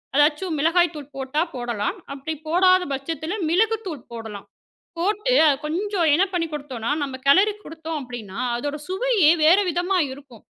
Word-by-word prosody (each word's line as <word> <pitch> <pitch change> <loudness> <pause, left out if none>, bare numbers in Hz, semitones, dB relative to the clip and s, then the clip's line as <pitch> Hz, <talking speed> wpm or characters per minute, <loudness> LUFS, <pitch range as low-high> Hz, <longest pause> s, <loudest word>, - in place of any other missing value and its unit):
அதாச்சும் 300 +3 +2
மிளகாய் 340 +2 +3
தூள் 295 -1 -9
போட்டா 270 +3 -1
போடலாம். 240 - -3 0.2
அப்டி 280 +3 -5
போடாத 370 +3 +4
பட்சத்தில 315 +5 -4 0.2
மிளகு 445 +6 +2
தூள் 310 -9 -7
போடலாம். 220 -3 -8 0.5
போட்டு 420 +7 0
அது 290 - +4
கொஞ்சம் 355 +1 0
என்ன 340 +6 +4
பண்ணிக் 330 -3 -1
கொடுத்தோம்னா 265 -6 -5
நம்ப 270 -2 -4
கெலரி 390 +9 +5
குடுத்தோம் 320 -1 -6
அப்படின்னா, 235 -5 -8 0.2
அதோட 290 +5 -3
சுவையே 385 -4 +3
வேற 340 +6 +6
விதமா 355 +2 0 0.2
இருக்கும். 265 -5 -15
315 Hz, 150 wpm, -23 LUFS, 275-365 Hz, 0.5 s, வேற